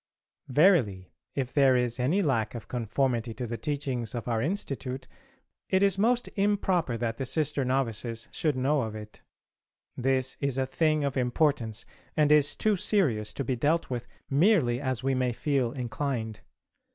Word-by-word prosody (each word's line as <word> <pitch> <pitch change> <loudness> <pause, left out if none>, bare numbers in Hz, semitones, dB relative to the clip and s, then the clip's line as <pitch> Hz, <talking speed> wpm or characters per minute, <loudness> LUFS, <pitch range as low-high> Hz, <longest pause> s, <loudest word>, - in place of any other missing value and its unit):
Verily, 130 - +3 0.2
if 130 -2 -2
there 135 -3 +5
is 125 0 -1
any 160 +11 +2
lack 120 -7 0
of 115 - -7
conformity 120 -1 -1
to 125 +2 -4
the 115 0 -4
teachings 130 -3 -3
of 120 - -5
our 115 -2 0
Institute 135 - -3 0.6
it 190 +1 +3
is 195 -1 +2
most 240 +3 +2
improper 190 - +1
that 115 -1 -2
the 135 - -3
sister 150 -1 +1
novices 115 -3 -1
should 150 -4 0
know 135 +3 +1
of 110 -2 -4
it. 105 0 -10 0.7
This 130 0 0
is 140 -2 -1
a 135 - +1
thing 155 +2 +1
of 140 -1 -1
importance, 125 -3 0 0.3
and 150 -1 +4
is 150 -1 +4
too 215 -1 +2
serious 125 - +1
to 140 - -2
be 130 0 -1
dealt 150 +5 0
with 120 -2 -3 0.2
merely 140 - +3
as 130 -3 -2
we 135 0 +1
may 130 -1 0
feel 135 -2 0
inclined. 120 -3 -3
130 Hz, 165 wpm, -28 LUFS, 120-150 Hz, 0.7 s, there